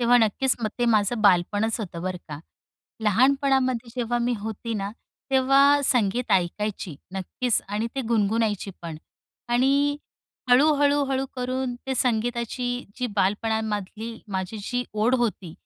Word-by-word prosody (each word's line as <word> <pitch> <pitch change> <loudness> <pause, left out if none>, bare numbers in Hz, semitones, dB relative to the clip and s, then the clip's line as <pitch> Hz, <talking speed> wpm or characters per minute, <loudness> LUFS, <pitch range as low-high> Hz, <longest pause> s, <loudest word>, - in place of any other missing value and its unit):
तेव्हा 240 +1 +5
नक्कीच 240 +4 +2
मग 220 - 0
ते 245 - +2
माझं 220 0 +2
बालपणच 205 +4 +3
होतं 175 -5 -6
बरं 185 0 -2
का. 145 -1 -6 0.7
लहानपणामध्ये 255 +1 +2
जेव्हा 240 0 0
मी 240 +1 0
होती 220 +2 -5
ना, 200 -1 -3 0.4
तेव्हा 275 +2 +5
संगीत 245 -2 +1
ऐकायची, 190 -2 -1 0.2
नक्कीच. 215 +5 -1
आणि 210 +3 -1
ते 270 - -1
गुणगुणायची 215 -2 +1
पण. 165 -2 -6 0.5
आणि 275 +4 +2 0.5
हळू, 280 +5 +6
हळू, 285 0 +3
हळू 270 0 -1
करून 255 0 -2
ते 265 - -1
संगीताची 245 +1 -1
जी 250 -1 -1
बालपणामधली 220 +2 -1
माझी 190 +2 -3
जी 245 +3 -2
ओढ 215 +4 +2
होती, 205 -8 -2
230 Hz, 135 wpm, -25 LUFS, 205-255 Hz, 0.7 s, हळू